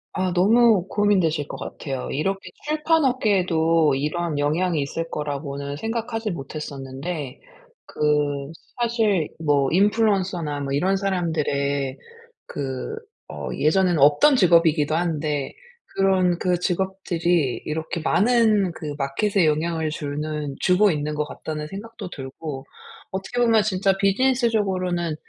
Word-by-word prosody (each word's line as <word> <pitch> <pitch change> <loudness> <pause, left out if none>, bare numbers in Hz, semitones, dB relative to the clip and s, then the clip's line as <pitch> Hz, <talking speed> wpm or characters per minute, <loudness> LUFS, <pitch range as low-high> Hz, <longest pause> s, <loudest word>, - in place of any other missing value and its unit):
아 185 -1 0
너무 205 +1 +4
고민되실 180 -8 +1
것 - - -7
같아요. 135 -3 -5
이렇게 195 +7 -2 0.2
출판업계에도 200 - +2
이런 150 +2 -2
영향이 160 +3 +1
있을 165 +4 -3
거라고는 140 -1 -4
생각하지 225 +1 -3
못했었는데 140 -1 -6 0.5
그 145 -1 0 0.3
사실 225 -8 +1
뭐 140 -2 +2
인플루언서나 190 -6 +1
뭐 135 -1 -4
이런 185 +7 +2
사람들의 145 -8 -1 0.5
그 135 - -5 0.3
어 - - -6
예전에는 175 +1 +2
없던 150 - +5
직업이기도 165 - +4
한데 155 -4 -1 0.4
그런 185 -3 +2
그 180 -1 +1
직업들이 175 -5 0
이렇게 160 +2 -3
많은 210 +1 +3
그 150 -2 -6
마켓에 165 +7 +1
영향을 160 +1 0
주는 150 -1 -4
'주고 190 +2 +4
있는 150 -1 -2
것 150 - 0
같다.'는 150 0 -6
생각도 205 +1 -8
들고 135 0 -7 0.5
어떻게 190 +6 -4
보면 225 -3 +4
진짜 195 -1 +1
비즈니스적으로는 195 -6 +1
170 Hz, 285 characters per minute, -23 LUFS, 150-195 Hz, 0.5 s, 없던